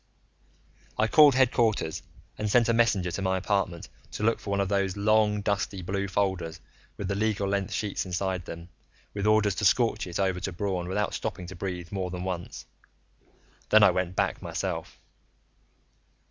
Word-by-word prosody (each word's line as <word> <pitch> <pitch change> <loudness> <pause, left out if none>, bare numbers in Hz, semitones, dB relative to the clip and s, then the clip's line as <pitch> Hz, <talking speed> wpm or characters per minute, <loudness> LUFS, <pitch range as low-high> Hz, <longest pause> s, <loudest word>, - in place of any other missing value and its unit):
I 110 - +3
called 145 +1 +7
headquarters 120 -9 +2 0.3
and 105 0 -2
sent 115 +1 +4
a 115 - +3
messenger 110 -6 +2
to 95 - -4
my 95 -1 +1
apartment 95 -3 -1 0.3
to - - -4
look 115 +1 +2
for - - -8
one 100 0 0
of 100 - +1
those 100 0 0
long 105 0 +3
dusty 100 -2 -2
blue 100 +2 -2
folders 95 -4 -1 0.4
with 100 - -4
the 100 - -1
legal 105 -1 0
length 100 0 -1
sheets 105 -2 -2
inside 95 -1 -2
them, 85 +1 -9 0.4
with 100 0 -2
orders 105 -1 +4
to 105 - -2
scorch 115 -1 +2
it 85 - -4
over 95 -2 +1
to 95 - -4
Braun 90 -1 -2
without 105 +3 -1
stopping 90 - -4
to 90 +2 -9
breathe 90 -3 -5
more 95 -2 -2
than 90 0 -5
once. 90 -2 -5 1.0
Then 110 0 +7
I 100 - +7
went 90 0 -2
back - - 0
myself. - - -4
100 Hz, 175 wpm, -27 LUFS, 90-105 Hz, 1.0 s, called